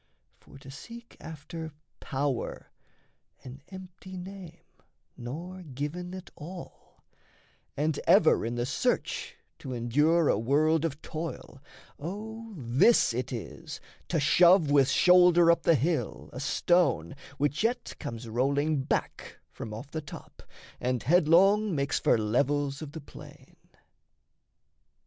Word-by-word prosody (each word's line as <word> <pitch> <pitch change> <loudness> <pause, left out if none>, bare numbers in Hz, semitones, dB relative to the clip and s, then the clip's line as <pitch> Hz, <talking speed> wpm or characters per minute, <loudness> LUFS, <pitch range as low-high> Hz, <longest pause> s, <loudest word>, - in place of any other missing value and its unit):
For - - -16
to 135 0 -12
seek 235 - -11
after 160 0 -8 0.3
power 135 -3 -3 0.7
an 130 +2 -10
empty 185 0 -10
name, 180 -2 -10 0.5
Nor 170 +10 -7
given 165 +5 -5
at 185 -1 -10
all 170 +4 -11 0.7
and 150 +1 0
ever - - +5
in 115 +2 -3
the 120 0 -1
search 250 - -1 0.2
To 130 -3 -6
endure 150 +8 +2
a - - +2
world 155 +6 +2
of 150 -2 -4
toil, 155 -4 -7 0.4
O 220 +8 -7
this 130 - +3
it 125 +3 -3
is 120 -4 -7 0.3
To 165 - 0
shove 170 +2 +5
with 140 -2 +4
shoulder 180 -1 +6
up 170 0 +1
the 165 - +4
hill 155 +4 -2
a 125 - -6
stone 140 - +1 0.2
Which 145 +2 0
yet 245 +2 -1
comes 120 -5 -6
rolling 140 +5 0
back 130 - -3
from 110 - -8
off 120 +7 -8
the 160 - -4
top, 145 - -12 0.4
And 125 -1 -1
headlong 180 +5 +4
makes 140 -1 0
for - - +3
levels 140 +6 0
of 150 -2 -8
the 160 - -7
plain. - - -14
155 Hz, 125 wpm, -28 LUFS, 135-180 Hz, 0.7 s, shoulder